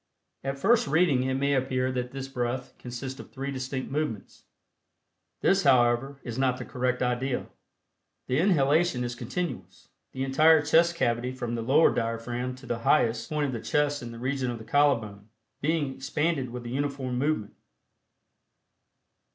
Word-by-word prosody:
At 135 Hz, 0 st, -3 dB
first 225 Hz, +5 st, +3 dB
reading 155 Hz, -3 st, +3 dB
it 130 Hz, 0 st, 0 dB
may 140 Hz, +1 st, +1 dB
appear 130 Hz, -1 st, 0 dB
that 125 Hz, -1 st, -3 dB
this 135 Hz, +1 st, -6 dB
breath 125 Hz, -1 st, -3 dB
consists 130 Hz, +2 st, -6 dB
of -, -, -10 dB
three 140 Hz, +1 st, -4 dB
distinct 130 Hz, 0 st, -4 dB
movements. 145 Hz, -8 st, -4 dB, 1.0 s
This, 195 Hz, +1 st, +3 dB
however, 130 Hz, 0 st, +3 dB
is 120 Hz, +1 st, -5 dB
not 130 Hz, -1 st, +2 dB
the -, -, -6 dB
correct 125 Hz, 0 st, -1 dB
idea. 125 Hz, +1 st, -1 dB, 0.8 s
The 130 Hz, +3 st, 0 dB
inhalation 160 Hz, -5 st, +3 dB
is 120 Hz, 0 st, -3 dB
continuous, 165 Hz, +4 st, -5 dB, 0.2 s
the 130 Hz, -, -3 dB
entire 155 Hz, +3 st, +5 dB
chest 170 Hz, +3 st, +4 dB
cavity 120 Hz, -4 st, 0 dB
from 120 Hz, -2 st, -4 dB
the 115 Hz, -, -2 dB
lowered 140 Hz, +8 st, +4 dB
diaphragm 120 Hz, +2 st, -2 dB
to 130 Hz, +1 st, -14 dB
the 120 Hz, -2 st, -3 dB
highest 115 Hz, 0 st, +2 dB
point 150 Hz, -1 st, 0 dB
of 135 Hz, -, -2 dB
the 115 Hz, -, -4 dB
chest 145 Hz, +5 st, 0 dB
in 120 Hz, -1 st, -7 dB
the 115 Hz, -, -9 dB
region 130 Hz, +1 st, -1 dB
of 120 Hz, -, -3 dB
the 110 Hz, -, -10 dB
collar 145 Hz, 0 st, +3 dB
bone, 105 Hz, -1 st, -11 dB, 0.3 s
being 150 Hz, -2 st, 0 dB
expanded 140 Hz, 0 st, -1 dB
with 120 Hz, 0 st, -7 dB
a -, -, -5 dB
uniform 135 Hz, -1 st, -2 dB
movement. 140 Hz, -7 st, -1 dB
130 Hz, 165 wpm, -27 LUFS, 120-145 Hz, 1.0 s, entire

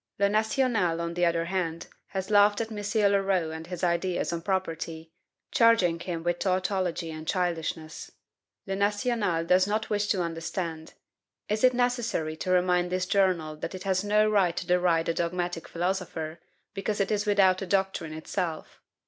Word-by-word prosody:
"Le 200 Hz, -, +3 dB
National," 220 Hz, -5 st, +1 dB
on 170 Hz, 0 st, -3 dB
the 175 Hz, 0 st, +2 dB
other 165 Hz, 0 st, 0 dB
hand, 170 Hz, -2 st, -2 dB, 0.2 s
has 190 Hz, +1 st, -4 dB
laughed 205 Hz, 0 st, +5 dB
at 225 Hz, 0 st, -3 dB
M. 205 Hz, -1 st, +1 dB
Leroux 195 Hz, -5 st, +1 dB
and 160 Hz, +1 st, -7 dB
his 180 Hz, -1 st, -6 dB
ideas 175 Hz, 0 st, 0 dB
on 170 Hz, -, -3 dB
property, 165 Hz, -3 st, -3 dB, 0.4 s
charging 230 Hz, -, +4 dB
him 170 Hz, -2 st, -4 dB
with 175 Hz, 0 st, 0 dB
TAUTOLOGY 185 Hz, -3 st, -1 dB
and 155 Hz, 0 st, -8 dB
CHILDISHNESS. 165 Hz, -3 st, -2 dB, 0.6 s
"Le 195 Hz, -, -2 dB
National" 205 Hz, -4 st, 0 dB
does 185 Hz, +2 st, +4 dB
not 215 Hz, +2 st, -1 dB
wish 205 Hz, 0 st, +1 dB
to 190 Hz, -4 st, +1 dB
understand. 165 Hz, -1 st, -4 dB, 0.5 s
Is 215 Hz, +2 st, -1 dB
it 255 Hz, -1 st, +5 dB
necessary 240 Hz, -10 st, 0 dB
to 185 Hz, -, -4 dB
remind 180 Hz, -1 st, +2 dB
this 185 Hz, 0 st, 0 dB
journal 180 Hz, -6 st, +1 dB
that 165 Hz, +4 st, -5 dB
it 185 Hz, -, -7 dB
has 190 Hz, -1 st, 0 dB
no 210 Hz, +1 st, +3 dB
right 190 Hz, -5 st, +2 dB
to 175 Hz, -, -2 dB
deride 175 Hz, -2 st, +2 dB
a 165 Hz, -, +1 dB
dogmatic 175 Hz, 0 st, -2 dB
philosopher, 170 Hz, -3 st, -3 dB, 0.3 s
because 205 Hz, +1 st, -2 dB
it 200 Hz, +1 st, 0 dB
is 210 Hz, 0 st, 0 dB
without 195 Hz, -2 st, +4 dB
a 195 Hz, -, -4 dB
doctrine 190 Hz, -4 st, 0 dB
itself? 160 Hz, +1 st, -4 dB
185 Hz, 165 wpm, -27 LUFS, 170-205 Hz, 0.6 s, laughed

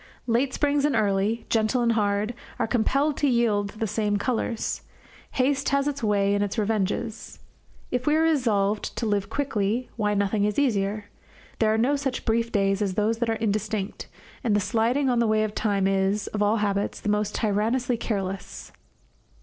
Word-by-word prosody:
Late 245 Hz, +3 st, +1 dB
springs 285 Hz, 0 st, +1 dB
and 290 Hz, -3 st, +2 dB
early, 210 Hz, +1 st, +1 dB
gentle 225 Hz, +2 st, +1 dB
and 235 Hz, -, +3 dB
hard, 210 Hz, 0 st, 0 dB, 0.2 s
are -, -, +1 dB
compelled 275 Hz, +6 st, +1 dB
to 290 Hz, -, +2 dB
yield 220 Hz, -5 st, +2 dB
the 220 Hz, +2 st, -4 dB
same 210 Hz, 0 st, 0 dB
colours; 230 Hz, 0 st, -2 dB, 0.5 s
haste 275 Hz, +2 st, +1 dB
has 280 Hz, 0 st, +1 dB
its 285 Hz, -1 st, -2 dB
way 200 Hz, -2 st, +2 dB
and 205 Hz, 0 st, +1 dB
its 205 Hz, +3 st, -3 dB
revenges. 215 Hz, +1 st, -2 dB, 0.5 s
If 250 Hz, +2 st, -2 dB
we 300 Hz, -, +4 dB
are 320 Hz, -, +3 dB
resolved 220 Hz, -10 st, +1 dB
to 235 Hz, -, -1 dB
live 205 Hz, -2 st, 0 dB
quickly, 230 Hz, -3 st, -1 dB
why, 210 Hz, -2 st, +1 dB
nothing 200 Hz, +1 st, +1 dB
is 210 Hz, 0 st, 0 dB
easier. 210 Hz, -6 st, 0 dB, 0.5 s
There 220 Hz, -1 st, +3 dB
are 220 Hz, -, +2 dB
no 255 Hz, +6 st, +2 dB
such 275 Hz, -3 st, -3 dB
brief 230 Hz, 0 st, +1 dB
days 195 Hz, -1 st, +1 dB
as 195 Hz, -3 st, -1 dB
those 220 Hz, +2 st, +1 dB
that 235 Hz, -1 st, 0 dB
are -, -, +2 dB
indistinct; 215 Hz, -2 st, -2 dB, 0.4 s
and 225 Hz, -4 st, +2 dB
the -, -, +4 dB
sliding 230 Hz, +7 st, +1 dB
on 245 Hz, -2 st, +2 dB
the 235 Hz, -, +2 dB
way 215 Hz, 0 st, +2 dB
of 215 Hz, -1 st, -2 dB
time 200 Hz, -3 st, 0 dB
is, 195 Hz, +1 st, +1 dB
of 210 Hz, -, -3 dB
all 210 Hz, +1 st, +3 dB
habits, 205 Hz, -1 st, -1 dB
the -, -, -7 dB
most 210 Hz, 0 st, 0 dB
tyrannously 230 Hz, +4 st, 0 dB
careless. 195 Hz, -4 st, -4 dB
215 Hz, 180 wpm, -25 LUFS, 205-240 Hz, 0.5 s, we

